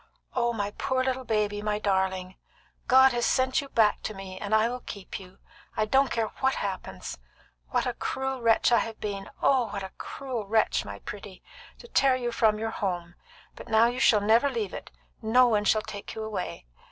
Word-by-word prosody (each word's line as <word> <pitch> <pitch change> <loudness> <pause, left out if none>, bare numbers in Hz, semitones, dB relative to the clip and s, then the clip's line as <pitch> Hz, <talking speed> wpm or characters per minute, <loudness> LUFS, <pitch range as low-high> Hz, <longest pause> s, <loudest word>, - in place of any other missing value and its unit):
Oh, 240 -1 +2
my 205 -3 -2
poor 260 -1 +1
little 260 0 -2
baby! 210 -2 0
my 210 0 0
darling! 190 -2 -1 0.5
God 265 +1 +7
has 240 -1 -1
sent 260 +4 +2
you 280 - -10
back 215 -4 +3
to 215 - -5
me, 190 -1 -8
and 205 +2 0
I 220 +1 +4
will 250 +1 -4
keep 200 -5 -7
you, 190 0 -14 0.4
I 215 - +2
don't 270 +5 +3
care 225 -2 -1
what 265 0 +2
happens! - - -5 0.5
What - - 0
a - - -1
cruel 265 -1 -3
wretch 230 +1 +4
I 235 - +6
have 225 -1 -4
been 200 -2 -4
oh, 260 -3 +4
what 200 -1 -5
a 190 - -7
cruel 250 -7 -5
wretch, 220 +1 +2
my 100 0 -7
pretty! 200 - -9 0.3
to 475 - -13
tear 270 - +3
you 240 -2 -2
from 220 -2 +3
your 225 +1 -3
home! 175 -5 -3 0.4
But - - -11
now 220 0 +5
you 245 +2 0
shall 210 -5 +5
never 225 +7 +4
leave 435 +3 -3
it; - - -7 0.3
no 240 +3 +5
one 210 -3 +1
shall 215 +1 +3
take 205 -2 -8
you 220 - -4
away." 205 - -5
220 Hz, 200 wpm, -27 LUFS, 205-250 Hz, 0.5 s, God